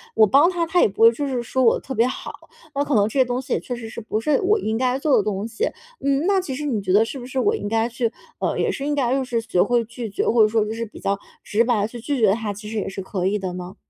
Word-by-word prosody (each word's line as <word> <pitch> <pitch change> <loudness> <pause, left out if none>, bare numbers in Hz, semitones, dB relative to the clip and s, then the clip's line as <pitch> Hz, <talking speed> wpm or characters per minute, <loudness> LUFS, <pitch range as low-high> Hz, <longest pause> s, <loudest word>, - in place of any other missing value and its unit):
我 220 - +7
帮 285 - +5
他， 345 -2 -1
他 340 +2 +2
也 - - +6
不 200 +3 -1
会 230 - +9
就 285 +4 -3
是 250 -3 -2
说 260 +2 0
我 230 - +4
特 265 - -7
别 235 +1 +3
好， - - -5 0.4
那 285 +1 0
可 285 -4 0
能 205 0 +4
这 265 +5 -2
些 - - +7
东 245 0 -2
西 260 - -3
也 - - +1
确 245 - -5
实 235 -2 -7
是 230 - -7
不 215 0 -2
是 280 +3 +1
我 415 +3 +3
应 220 -8 -2
该 255 +2 +1
做 280 0 +2
的 - - +4
东 205 0 -2
西。 - - -14 0.5
嗯， 280 +2 +1
那 395 -1 +3
其 290 -8 -4
实 295 - -4
你 230 -8 -1
觉 185 -1 -1
得 210 - +6
是 260 +4 -6
不 245 - -8
是 260 +1 -6
我 415 +11 +2
应 430 - -3
该 225 +2 +1
去 235 -1 -1 0.3
呃， - - -1
也 - - +1
是 275 - -4
应 295 0 0
该 255 -3 +1
就 270 - +1
是 235 -2 -1
学 180 -5 +1
会 240 -1 +2
拒 235 0 -7
绝， 195 - -2
或 235 - +3
者 215 - +7
说 220 0 +1
就 215 - -4
是 230 0 -3
比 215 - -14
较 200 0 -1 0.2
直 215 +2 +1
白 230 -4 +2
地 205 - 0
去 240 0 -8
拒 275 +4 -2
绝 205 -3 +5
他， 215 -1 -2
其 210 +1 -9
实 225 - -4
也 205 - -2
是 195 0 -5
可 185 -1 -2
以 210 +2 +1
的 190 -2 -4
呢？ 180 +1 -7
235 Hz, 350 characters per minute, -22 LUFS, 215-270 Hz, 0.5 s, 会